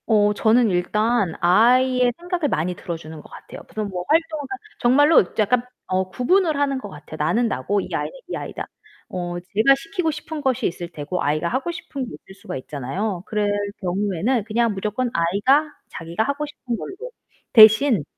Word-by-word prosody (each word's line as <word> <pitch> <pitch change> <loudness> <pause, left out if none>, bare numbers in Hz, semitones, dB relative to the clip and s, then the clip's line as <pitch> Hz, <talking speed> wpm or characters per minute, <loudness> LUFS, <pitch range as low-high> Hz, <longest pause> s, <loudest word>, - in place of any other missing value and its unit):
어, 210 -2 +4
저는 225 +2 +3
일단 200 +1 +1
아이의 250 +7 +4
생각을 350 -3 -2
많이 175 -1 -1
들어주는 160 -3 -7
것 - - -17
같아요. - - -11
그런 215 -1 -3
뭐 180 -2 -4
활동을 320 -1 +1
하든 390 +2 -6 0.2
정말로 290 +6 +5
이제 180 - -7
약간 240 +3 +1 0.2
어 185 0 -1
구분을 320 - +2
하는 275 -2 0
것 205 - -8
같아요. 155 -1 -10
나는 175 +11 +1
나고 200 - -1
이 - - -7
아이는 - - -2 0.2
이 - - -3
아이다. - - -6 0.4
어, 175 -1 -4
제가 215 +9 +3
시키고 325 +4 -3
싶은 305 +1 -6
것이 265 -3 0
있을 175 0 -5
테고, 170 +2 -5
아이가 155 +4 0
하고 265 - -2
싶은 280 -6 -6
게 - - -10
있을 - - -13
수가 - - -5
있잖아요. 155 - -4
그럴 210 -1 -1 0.3
경우에는 200 +5 0
그냥 230 0 +1
무조건 210 +6 -2
아이가 205 - +2 0.2
자기가 170 +6 -3
하고 280 +4 -2
싶은 255 -5 -5
걸로. 385 - -7 0.6
대신. 220 - +7
220 Hz, 375 characters per minute, -22 LUFS, 180-270 Hz, 0.6 s, 대신